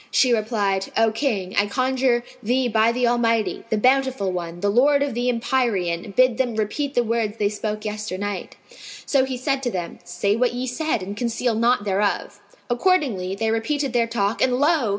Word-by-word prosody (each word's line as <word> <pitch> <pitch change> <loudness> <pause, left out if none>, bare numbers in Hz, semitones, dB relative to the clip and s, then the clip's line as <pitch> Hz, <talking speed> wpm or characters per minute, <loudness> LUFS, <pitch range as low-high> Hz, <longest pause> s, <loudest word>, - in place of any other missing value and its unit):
She 255 -2 +3
replied, 210 -4 0
"O 225 0 +4
King, 215 -6 -2
I 205 0 +3
conjure 255 +2 +1 0.2
thee 250 +3 +1
by 225 0 +3
the 245 +1 0
Almighty, 230 -2 +1
the 220 - +1
Bountiful 260 -3 +2
One, 175 -1 -5
the 205 - +1
Lord 280 +5 +4
of 285 - -2
the 245 +2 0
Empyrean, 210 -7 -1
bid 255 -2 +4
them 245 -4 0
repeat 270 +7 -2
the 245 - +3
words 225 -2 -1
they 205 -2 +1
spoke 210 0 -4
yesternight." 205 -2 -4 0.5
So 270 -2 +2
he 260 -1 -4
said 270 +2 -1
to 250 - -1
them, 180 -6 -5
"Say 180 +4 -1
what 245 +1 +1
ye 250 +1 -2
said 260 - -2
and 200 +2 -6
conceal 235 +1 -1
naught 235 0 +2
thereof." 200 0 -1 0.3
Accordingly, 240 - +1
they 220 +2 -1
repeated 270 +4 -1
their 235 -1 +2
talk, 225 -1 -1
and 250 -1 +2
lo! 295 -5 +2
230 Hz, 185 wpm, -22 LUFS, 205-255 Hz, 0.5 s, O